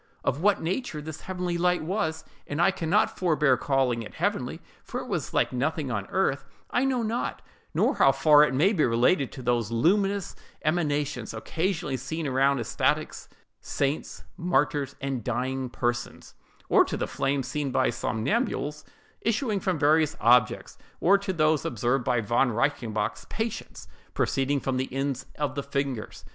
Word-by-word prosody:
Of 140 - -1
what 205 -1 +3
nature 185 0 -2
this 150 0 -7
heavenly 180 -2 -3
light 180 -1 +2
was—and 160 -4 -4
I 175 +3 +5
can 175 -4 -4
not 210 +5 +2
forbear 150 -7 +3
calling 130 -3 +1
it 110 - -9
heavenly, - - -1 0.2
for - - -5
it - - -7
was - - -3
like - - +1
nothing 140 +1 -1
on 100 -4 -3
earth—I 190 - -1
know 255 -3 +1
not, 225 +2 -2 0.3
nor - - +3
how - - +6
far 150 -1 +6
it 150 - +2
may 180 +10 +4
be 160 -7 +2
related 125 +5 +2
to 130 - -8
those 120 -3 +1
luminous 195 - +1 0.3
emanations 145 -7 -1
occasionally 160 - -2
seen 155 +6 -4
around 135 0 +2
ecstatics, 115 - -1 0.3
saints, 140 +2 -2
martyrs, 150 -5 0
and 135 -4 -3
dying 130 +2 -2
persons; 120 0 -3 0.3
or - - +6
to - - -4
the - - -1
flames 135 -1 -1
seen 150 -2 -2
by - - +2
somnambules 150 - -1 0.4
issuing 225 -2 0
from 185 -3 -1
various 155 +2 +3
objects, 120 +1 +3 0.2
or 195 +3 +5
to 200 -1 -3
those 155 -3 +2
observed 120 +3 0
by 120 -1 +1
Von 120 +4 +2
Reichenbach's 115 -3 -1
patients 225 0 -5 0.3
proceeding 140 +1 +1
from 130 -1 -2
the 130 - -2
ends 135 0 -2
of 145 -3 -1
the 140 - -2
fingers, 140 -4 -3
&c. - - -18
145 Hz, 160 wpm, -27 LUFS, 130-175 Hz, 0.4 s, how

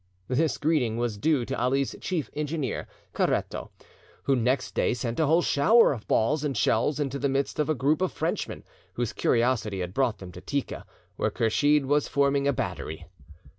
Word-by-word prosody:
This 150 +5 +1
greeting 145 -8 +1
was 120 -3 -2
due 145 -2 +2
to - - -3
Ali's 135 +2 +1
chief 175 -6 -2
engineer, 150 -3 -3 0.3
Caretto, - - -1 0.5
who 135 - +2
next 125 +1 0
day - - +1
sent 120 +1 -3
a 160 - +3
whole 165 +3 +4
shower 215 +8 +5
of 115 -5 -9
balls 145 +7 +2
and 140 -5 -1
shells 115 +7 +1
into 140 -1 -2
the 140 - 0
midst 135 +2 -1
of 150 - +1
a 155 - +2
group 145 +5 +1
of 185 - +1
Frenchmen, - - -3 0.3
whose 120 +1 -2
curiosity 115 -5 +1
had 90 0 -4
brought 130 -3 +1
them 95 -2 -10
to 90 - -11
Tika, 140 +8 -4 0.3
where - - +1
Kursheed 145 +6 +2
was 145 +1 +2
forming 140 0 +2
a - - +4
battery. 80 -9 -4
135 Hz, 180 wpm, -27 LUFS, 115-150 Hz, 0.5 s, shower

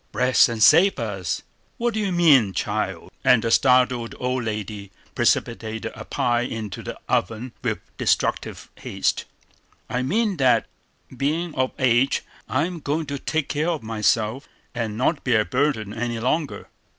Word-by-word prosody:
"Bless 125 +3 +4
and 115 -2 0
save 190 - +6
us, 100 -6 -3 0.3
what 235 0 0
do 220 - -1
you 200 -3 -1
mean, 145 - +5
child?" - - -3
And 125 -3 +5
the 115 - 0
startled 125 -2 +3
old 125 -1 -1
lady 105 -2 -5 0.2
precipitated 110 -1 0
a - - -9
pie 120 -1 0
into 110 -5 -5
the - - -7
oven 115 +5 -1
with - - -1 0.2
destructive - - 0
haste. - - -1 0.7
"I 125 - 0
mean 205 - 0
that, 130 -3 +3 0.5
being 155 +6 -1
of 130 0 -1
age, 130 -1 +2 0.3
I'm 165 +6 -1
going 150 +2 -2
to 140 -1 -5
take 160 0 -1
care 155 +4 -1
of 160 -8 -2
myself, 110 +3 0 0.3
and 115 -3 -3
not 140 +5 0
be 130 -3 +2
a 105 -1 +3
burden 125 -6 0
any 120 +1 -3
longer. 145 +5 -1
125 Hz, 150 wpm, -23 LUFS, 110-150 Hz, 0.7 s, save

